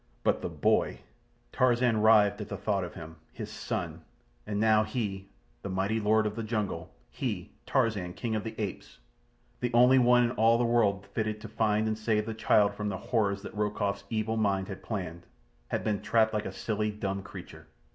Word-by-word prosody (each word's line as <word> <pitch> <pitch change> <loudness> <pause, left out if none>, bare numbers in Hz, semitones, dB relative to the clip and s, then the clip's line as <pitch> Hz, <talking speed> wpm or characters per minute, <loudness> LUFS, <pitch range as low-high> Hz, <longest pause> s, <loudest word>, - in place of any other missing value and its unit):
But - - +2
the - - -3
boy! - - +1 0.5
Tarzan 120 -3 +3
writhed 105 -1 +5
at 105 - -6
the 100 - -4
thought 100 0 0
of 90 - -7
him. 80 -1 -9
His - - -7
son! - - -4 0.5
And 105 - -2
now 110 0 +4
he—the 100 -3 -6
mighty 95 +4 0
Lord 110 +1 +3
of 105 0 -2
the 115 - -3
Jungle—he, 105 -7 -4 0.2
Tarzan, 105 -9 0
King 115 -3 -2
of 105 - -2
the 110 - -7
Apes, 100 -4 -5 0.6
the 120 -1 -1
only 125 +2 +7
one 125 0 +5
in 120 - +1
all 115 -1 +4
the 120 - +1
world 105 -4 +2
fitted 110 -1 -1
to 115 - -7
find 110 0 +1
and 110 - 0
save 110 -1 +1
the 115 - -4
child 105 -1 +3
from 105 0 -3
the 95 - -3
horrors 100 -1 0
that - - -8
Rokoff's 100 -1 -1
evil 110 0 -1
mind 100 -3 0
had 95 - -7
planned—had 85 - -6
been 105 -2 -1
trapped 110 -1 +2
like 105 0 -1
a - - -5
silly, 110 -1 -2
dumb 100 -2 -3
creature. 95 - -11
105 Hz, 185 wpm, -29 LUFS, 100-110 Hz, 0.6 s, only